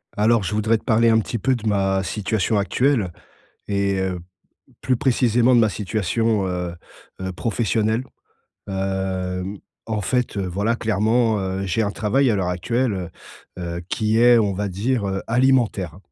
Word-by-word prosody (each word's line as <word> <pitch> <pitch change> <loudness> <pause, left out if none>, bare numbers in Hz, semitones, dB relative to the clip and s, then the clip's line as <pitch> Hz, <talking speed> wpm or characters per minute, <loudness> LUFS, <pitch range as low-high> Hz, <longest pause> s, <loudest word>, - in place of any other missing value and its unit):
Alors 110 +1 +3
je 95 - -3
voudrais 110 +2 +2
te - - -16
parler 115 +1 +3
un 110 - +5
petit 115 +2 -3
peu 130 +6 +1
de 110 -2 -5
ma 95 -2 +1
situation 105 +1 0
actuelle, 110 -2 +1 0.6
et 100 -1 0
heu, 95 -1 -2
p 90 +1 -19 0.4
plus 130 - +1
précisément 125 -2 +3
de 120 - +6
ma 110 -2 +3
situation, 105 +1 0
heu 90 -1 -3 0.5
heu 95 0 -3
professionnelle. 110 +3 0 0.6
Hem 95 0 -3 0.3
en 110 -2 -2
fait, 125 +2 -1
heu 100 - -1
voilà, 100 +6 0
clairement 110 0 +1
heu, 95 0 -3
j'ai 95 +4 0
un 105 - 0
travail 130 +7 +1
à 110 - +2
l'heure 95 -2 -1
actuelle, 115 +6 0
heu 90 -2 -4 0.7
heu - - -5
qui 110 0 +1
est, 120 0 +7
on 105 -3 +2
va 100 +2 -2
dire, 105 +4 -1
heu, 95 0 -2
alimentaire. 115 -8 +1
105 Hz, 170 wpm, -22 LUFS, 95-115 Hz, 0.7 s, est